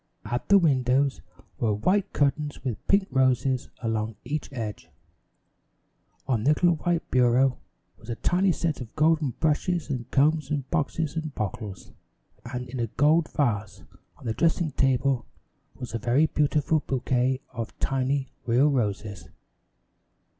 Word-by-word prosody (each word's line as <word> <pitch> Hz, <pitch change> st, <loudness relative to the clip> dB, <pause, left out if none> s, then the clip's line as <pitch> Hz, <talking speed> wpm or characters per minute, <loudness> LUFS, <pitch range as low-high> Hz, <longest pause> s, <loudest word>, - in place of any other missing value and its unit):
At 120 Hz, -, -3 dB
the 200 Hz, -, +8 dB
windows 135 Hz, -4 st, +2 dB, 0.4 s
were 110 Hz, -3 st, +1 dB
white 195 Hz, -, +1 dB
curtains 145 Hz, +1 st, 0 dB
with 125 Hz, -6 st, -4 dB
pink 200 Hz, -1 st, +3 dB
roses 130 Hz, -1 st, +1 dB
along 110 Hz, -1 st, -1 dB
each 145 Hz, +4 st, -4 dB
edge. 110 Hz, -6 st, -6 dB, 1.4 s
On 120 Hz, -5 st, +1 dB
the 135 Hz, -, +3 dB
little 170 Hz, +2 st, +3 dB
white 170 Hz, +1 st, -1 dB
bureau 125 Hz, +1 st, +3 dB, 0.4 s
was 115 Hz, -, -14 dB
a 115 Hz, -, -2 dB
tiny 185 Hz, +8 st, +2 dB
set 160 Hz, -4 st, -2 dB
of 115 Hz, -, -9 dB
golden 155 Hz, -4 st, +2 dB
brushes 160 Hz, +1 st, 0 dB
and 125 Hz, -4 st, -4 dB
combs 150 Hz, +1 st, +2 dB
and 145 Hz, -3 st, -2 dB
boxes 160 Hz, -1 st, -1 dB
and 155 Hz, -3 st, -4 dB
bottles, 105 Hz, -2 st, -5 dB, 0.6 s
and 125 Hz, 0 st, -4 dB
in 125 Hz, +1 st, -6 dB
a 115 Hz, -, 0 dB
gold 150 Hz, +7 st, +2 dB
vase 105 Hz, -8 st, -1 dB, 0.3 s
on 145 Hz, -, -15 dB
the 110 Hz, -, -1 dB
dressing 165 Hz, -, +1 dB
table 135 Hz, -2 st, +1 dB, 0.5 s
was 125 Hz, -2 st, -8 dB
a 115 Hz, -, -1 dB
very 125 Hz, +7 st, +3 dB
beautiful 150 Hz, 0 st, +1 dB
bouquet 130 Hz, 0 st, 0 dB
of 115 Hz, -2 st, -6 dB
tiny 135 Hz, 0 st, -1 dB, 0.2 s
real 130 Hz, +5 st, +4 dB
roses. 105 Hz, -5 st, -2 dB
135 Hz, 140 wpm, -26 LUFS, 120-155 Hz, 1.4 s, the